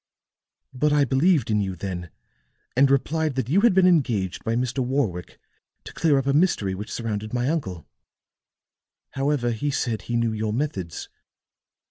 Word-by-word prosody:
"But 150 +4 +1
I 145 -1 +4
believed 140 +1 +2
in 105 -1 +2
you 95 -2 -3
then, 90 -1 -5 0.7
and 135 +2 +5
replied 150 +2 +1
that 130 -3 -2
you 185 +8 +3
had 230 -4 +4
been 190 -1 +5
engaged 120 - +1
by 115 - -1
Mr. 125 +2 -1
Warwick 125 -9 -2 0.4
to - - -10
clear 155 -4 +2
up 135 - 0
a 140 - +1
mystery 145 - +2
which 105 +3 -7
surrounded 110 -1 -4
my 125 +1 0
uncle. 95 - -3 1.2
However, 135 -3 0
he 130 +6 -2
said 120 -5 -1
he 120 - -4
knew 115 -1 0
your 110 0 -2
methods. 100 - -3
125 Hz, 160 wpm, -24 LUFS, 105-145 Hz, 1.2 s, and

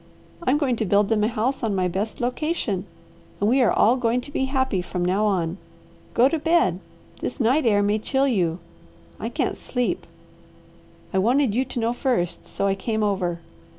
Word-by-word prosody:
I'm 290 -4 +2
going 265 -5 0
to 220 - -1
build 200 +1 +3
them 215 -2 +2
a - - +3
house 240 +4 -1
on 220 -4 0
my 185 -1 +1
best 200 +8 -3
location, 245 - -2 0.5
and 205 - +1
we 260 +4 +4
are 245 - +4
all 235 +4 +4
going 240 0 +1
to 285 - -11
be 265 - 0
happy 265 -8 0
from 175 0 -3
now 195 +4 +2
on. 180 -2 -1 0.6
Go 245 +2 +6
to 325 +3 -1
bed! 325 - +2 0.4
This - - -4
night 255 +4 +3
air 205 -2 +4
may 205 +1 +1
chill 270 +5 +1
you. 175 -9 +1 0.6
I - - -3
can't - - -1
sleep. 245 -1 -2 1.1
I 190 - +2
wanted 245 +3 +2
you 255 +4 +1
to 250 - -4
know 230 +1 0
first 210 -10 -1
so - - -2
I 195 - +3
came 220 +2 -2
over. 180 -4 -1
225 Hz, 190 wpm, -24 LUFS, 195-260 Hz, 1.1 s, Go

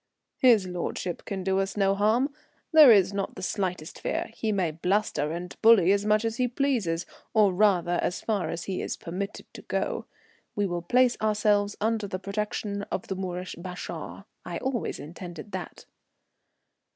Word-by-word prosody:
"His 235 -7 +5
lordship 180 0 -4
can 195 -2 -4
do 190 0 +1
us 195 +1 -2
no 195 -1 +3
harm. 225 +8 +2 0.4
There 310 -6 +9
is 195 -3 +5
not 200 -1 -3
the 185 - -8
slightest 180 -5 -3
fear. - - -2
He 220 -1 -2
may 185 -5 0
bluster 175 -2 0
and 175 +2 -5
bully 220 -5 +7
as 200 +1 +1
much 215 +1 +3
as 225 0 -2
he 250 - +2
pleases, 235 - 0 0.3
or 205 -3 +5
rather, 180 -3 +3
as 175 - -1
far 210 -4 -1
as 170 0 -4
he 190 -2 -3
is - - -3
permitted 190 +4 -5
to - - -9
go. - - -2 0.5
We 205 - +1
will 175 -2 -2
place 250 +7 +3
ourselves 210 -1 +2
under 220 -1 0
the 185 - -3
protection 200 +1 -3
of 185 - -4
the 190 - -1
Moorish 185 -1 -4
bashaw. 180 +1 -7 0.2
I - - -5
always 260 -3 -2
intended 170 +4 -9
that." 185 -3 -7
200 Hz, 170 wpm, -27 LUFS, 180-215 Hz, 0.5 s, There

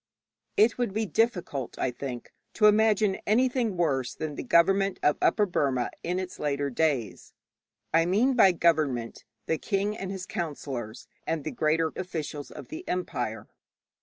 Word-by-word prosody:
_ - - -65 0.5
It 225 +4 +4
would 235 -5 -1
be 220 0 +1
difficult, 180 - -1
I 130 - 0
think, 125 -1 -7 0.2
to 215 - +3
imagine 210 -2 +4
anything 240 -2 +2
worse 135 -7 0
than 155 -1 -4
the - - -5
government 195 +3 +3
of 150 - +3
Upper 210 - +3
Burma 135 -9 0
in 175 +2 -2
its 185 -1 -5
later 140 -1 -1
days. 130 -6 -1 0.6
I 165 +1 +4
mean 225 +9 +3
by 210 -7 +6
'government' 150 -9 0 0.2
the 160 - -1
king 200 +2 -1
and 195 -3 -5
his 190 -1 -5
counsellors 135 -10 -5 0.2
and 160 -2 -1
the 155 - -4
greater 160 +1 +1
officials 155 -5 -5
of - - -10
the 320 +3 -7
empire. 125 -11 -3
170 Hz, 160 wpm, -27 LUFS, 140-205 Hz, 0.6 s, by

